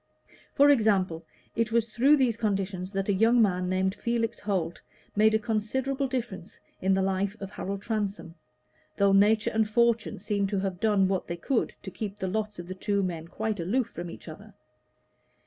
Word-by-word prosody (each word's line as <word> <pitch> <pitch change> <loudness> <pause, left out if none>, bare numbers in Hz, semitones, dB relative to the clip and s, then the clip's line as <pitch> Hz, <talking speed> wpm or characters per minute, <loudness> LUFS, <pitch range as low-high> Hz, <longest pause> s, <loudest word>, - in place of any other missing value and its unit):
For 285 0 +7
example, 195 -9 +2 0.3
it 230 -1 0
was 230 0 +1
through 270 +7 +4
these 250 -5 +2
conditions 195 -4 -2
that 195 0 -1
a 200 - +2
young 225 +5 +4
man 180 -4 +2
named 190 +1 +1
Felix 235 +1 -2
Holt 180 -5 -2 0.3
made 220 +1 +4
a - - +6
considerable 250 +5 -1
difference 240 -9 -5 0.2
in 190 +1 +3
the 190 - +1
life 195 +2 -1
of 195 0 -7
Harold 195 0 -5
Transome, 205 -6 -3 0.6
though 200 0 +4
nature 210 +2 +4
and 220 -1 +1
fortune 235 0 +2
seemed 200 -2 -1
to 200 -1 0
have 190 -2 -3
done 205 -3 +3
what 190 -1 -1
they 170 - -4
could 245 +7 -1
to 190 - -7
keep 205 0 -5
the 190 - -3
lots 210 +2 -2
of 175 0 -8
the 185 - -5
two 200 +1 -1
men 170 -3 -4
quite 215 +2 -3
aloof 230 +8 0
from 175 0 -6
each - - -11
other. 205 +7 -11
205 Hz, 185 wpm, -28 LUFS, 190-225 Hz, 0.6 s, For